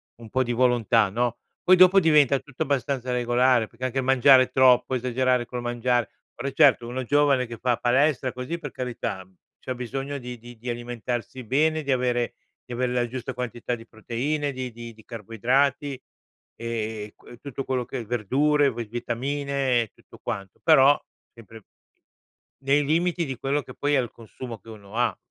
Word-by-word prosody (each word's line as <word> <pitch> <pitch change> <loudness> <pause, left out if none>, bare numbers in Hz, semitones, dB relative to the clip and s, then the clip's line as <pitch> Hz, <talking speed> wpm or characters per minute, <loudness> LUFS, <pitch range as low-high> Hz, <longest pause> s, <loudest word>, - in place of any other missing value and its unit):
un 115 -1 -13
po' 130 - +1
di 120 - -3
volontà, 120 -3 +3
no, 120 +3 -1 0.3
poi, 185 - +6
dopo 185 +1 +7
diventa 150 -5 +4
tutto 135 +2 -5
abbastanza 135 -3 -1
regolare, 120 -1 +2
perché 120 +3 -7
anche 130 +1 -3
il - - -1
mangiare 130 0 +6
troppo, 130 0 +4
esagerare 125 0 +1
col 125 +1 -5
mangiare. 120 0 0 0.3
Ora, - - -4
eh - - -11
certo, 135 -6 +4
uno 130 +2 -3
giovane, 140 0 +3
che 115 -1 -8
fa 125 -2 +1
palestra, 130 +1 +2
così, 125 +7 -4
per 145 -4 -7
carità, 120 -6 -4
mhmm, 95 0 -28 0.2
c'ha 130 - -5
bisogno 135 +3 -4
di 125 -2 -8
di 120 +1 -13
di 120 +3 -7
alimentarsi 120 +1 -5
bene, 155 +6 +1
di 140 - -1
avere 125 -2 0 0.3
di 125 - -8
ave 125 +1 0
la 125 -1 0
giusta 130 +2 -5
quantità 120 -1 -3
di 115 -1 -13
proteine, 140 +7 -2
di 130 -1 -5
di 115 0 -9
di 110 -1 -19
carboidrati, 125 +5 0 0.5
ehm, 110 -2 -4
qu - - -23
e 120 - -12
tutto 135 0 -6
quello 130 -2 -2
che 125 -1 -5
verdure, 135 +6 +2
ve 120 0 -5
vitamine, 130 +3 -1
e 110 - -13
tutto - - -18
quanto. 100 -2 -6
Però, 145 -3 +6 0.3
sempre, 115 -2 -14 1.0
nei 140 +2 +3
limiti 170 +3 +1
di 135 -3 -5
quello 140 +2 0
che - - -11
poi 145 0 +1
è - - +4
il 120 - -6
consumo 115 +1 -9
che 115 - -16
uno 105 -1 -12
ha, 120 -5 +1
125 Hz, 185 wpm, -25 LUFS, 120-135 Hz, 1.0 s, dopo